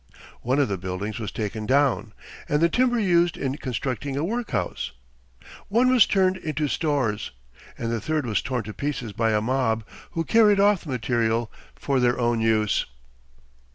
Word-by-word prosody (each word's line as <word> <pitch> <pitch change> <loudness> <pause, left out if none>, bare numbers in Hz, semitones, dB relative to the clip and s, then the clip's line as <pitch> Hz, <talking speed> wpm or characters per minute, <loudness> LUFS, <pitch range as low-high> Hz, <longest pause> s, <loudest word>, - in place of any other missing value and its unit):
One 130 +3 0
of 145 - +3
the 100 -3 -3
buildings 95 +4 -4
was 110 - -4
taken 110 0 -4
down, 130 -5 +2 0.4
and 150 - +2
the 170 +1 +4
timber 245 +3 +2
used 175 -4 +2
in 135 0 -2
constructing 130 +1 -3
a 145 - 0
workhouse; 225 - -2 0.7
one 240 +5 +3
was 250 -4 +6
turned 190 -1 +2
into 155 -3 -2
stores, 135 -9 -1 0.5
and 115 0 -3
the 115 -2 -2
third 155 -3 -1
was 110 -4 0
torn 130 -3 -2
to 110 +1 -7
pieces 130 -6 -4
by 115 +2 +1
a 105 -1 +2
mob, 115 -2 0 0.3
who 165 - -1
carried 210 +1 +4
off 200 -3 +3
the - - -8
material 115 -2 0 0.2
for 140 -2 0
their 125 0 +2
own 120 -1 +1
use. 110 -2 +1
130 Hz, 170 wpm, -24 LUFS, 110-165 Hz, 0.7 s, was